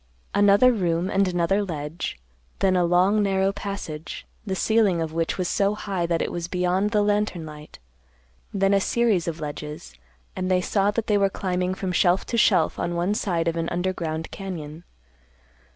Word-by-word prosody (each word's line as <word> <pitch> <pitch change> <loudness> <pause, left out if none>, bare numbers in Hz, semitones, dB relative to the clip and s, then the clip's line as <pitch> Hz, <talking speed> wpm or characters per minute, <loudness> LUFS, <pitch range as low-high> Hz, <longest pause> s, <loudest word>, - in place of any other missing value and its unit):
Another 205 +5 +5
room, 180 -2 0
and 195 0 +2
another 180 +3 +1
ledge; 160 - -5 0.4
then 190 -1 +2
a 180 - +3
long 185 +5 +3
narrow 195 -1 +2
passage, 195 -6 -6 0.2
the 190 -3 -3
ceiling 210 -3 +2
of 160 -1 -3
which 165 0 -1
was 185 -2 -1
so 200 +3 +1
high 195 -5 -2
that 170 -1 0
it - - -3
was 170 -1 -4
beyond 180 +3 +1
the 210 -1 +2
lantern 205 -5 0
light; 150 0 -11 0.7
then 195 -1 +2
a 195 - +3
series 220 -6 +1
of 165 -1 -3
ledges, 150 - -7 0.4
and 185 0 -2
they 185 -1 +3
saw 195 +2 +1
that 220 +2 -1
they 210 -1 +2
were 195 0 +3
climbing 185 -1 -2
from 190 -1 -3
shelf 180 0 +2
to - - -3
shelf 185 -7 +3
on 175 0 -2
one 175 +4 +1
side 175 -6 -1
of 165 - 0
an 165 0 -2
underground 170 -3 -3
cañon. 165 -5 -7
185 Hz, 180 wpm, -24 LUFS, 170-200 Hz, 0.7 s, Another